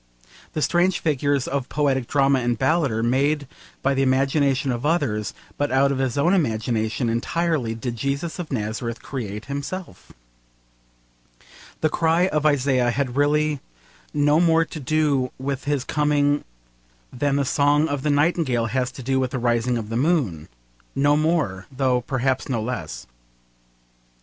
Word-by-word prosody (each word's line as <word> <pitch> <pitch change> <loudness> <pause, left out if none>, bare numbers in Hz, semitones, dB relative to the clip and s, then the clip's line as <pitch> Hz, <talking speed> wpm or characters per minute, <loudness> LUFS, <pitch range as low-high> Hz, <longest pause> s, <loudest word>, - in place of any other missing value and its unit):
The 155 - -1
strange 180 +1 +2
figures 145 -3 0
of 135 -2 -2
poetic 135 -4 0
drama 140 -1 +3
and 120 -1 0
ballad 155 +3 +2
are 115 0 -1
made 140 +4 +1 0.4
by 140 - +2
the 135 - +1
imagination 135 0 +2
of 120 +1 -3
others, 135 - 0 0.3
but 145 0 0
out 135 +1 +3
of 135 - -1
his 130 -2 -1
own 170 +6 +3
imagination 115 - 0
entirely 125 +1 0
did 120 +1 -4
Jesus 140 +8 -3
of 170 -4 -5
Nazareth 115 0 -3
create 105 -5 -5
himself. 145 +7 -6 1.7
The 155 - +3
cry 165 +3 +2
of 155 -2 +1
Isaiah 130 -4 +2
had 125 0 -1
really 150 +1 +2 0.5
no 145 +1 +3
more 165 -1 +4
to 155 - -8
do 145 -2 +1
with 135 +1 -4
his 145 -3 0
coming 145 0 +1 0.7
than 140 +2 0
the 140 0 +1
song 145 +3 +3
of 145 -3 -2
the 150 - -1
nightingale 145 -5 +2
has 130 -1 0
to 130 - -9
do 130 +2 +1
with 130 -1 0
the 130 - -3
rising 120 0 +1
of 110 -2 -5
the 115 - -2
moon 125 - 0 0.5
no 145 +1 +3
more, 150 - 0
though 130 -2 +1
perhaps 130 +2 -1
no 120 -4 0
less. 110 -8 -5
140 Hz, 155 wpm, -23 LUFS, 125-150 Hz, 1.7 s, more